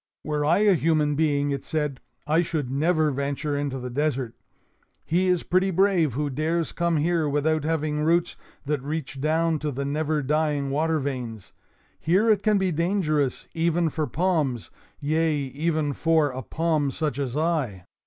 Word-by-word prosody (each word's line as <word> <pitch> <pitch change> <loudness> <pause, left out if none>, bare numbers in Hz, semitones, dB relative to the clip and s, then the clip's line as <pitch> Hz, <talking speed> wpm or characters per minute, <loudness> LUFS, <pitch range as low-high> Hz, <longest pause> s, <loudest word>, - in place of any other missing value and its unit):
"Were 150 -1 -1
I 155 +4 +3
a 210 -2 +5
human 155 -3 +2
being," 145 -1 +1
it 140 -1 -3
said, 150 -4 -2 0.3
"I 155 +3 +3
should 155 -6 -2
never 155 +2 +2
venture 140 +2 -2
into 140 -2 -2
the 125 -1 -6
desert. 135 -3 -1 0.7
He 180 +3 +1
is 180 -2 +2
pretty 185 +2 +2
brave 185 - +2
who 145 0 -1
dares 160 +4 -1
come 170 -1 0
here 160 0 +1
without 150 +1 +1
having 155 -1 -1
roots 170 +2 +2 0.3
that 145 -1 -1
reach 145 -1 -4
down 160 +1 +1
to 150 - -2
the 140 +1 -3
never 150 +1 -1
dying 145 -1 0
water 160 +3 +1
veins. 125 -8 -5 0.5
Here 195 +7 +3
it 205 -2 +2
can 215 -1 +3
be 190 -2 +1
dangerous 155 -5 0
even 165 0 +1
for 155 -1 -2
palms; 155 - -1 0.3
yea, 155 +2 +1
even 145 +2 -1
for 160 -1 +2
a 130 +1 -5
palm 155 -1 0
such 145 -1 -2
as 135 -1 -2
I. 150 - -1
155 Hz, 165 wpm, -25 LUFS, 140-165 Hz, 0.7 s, a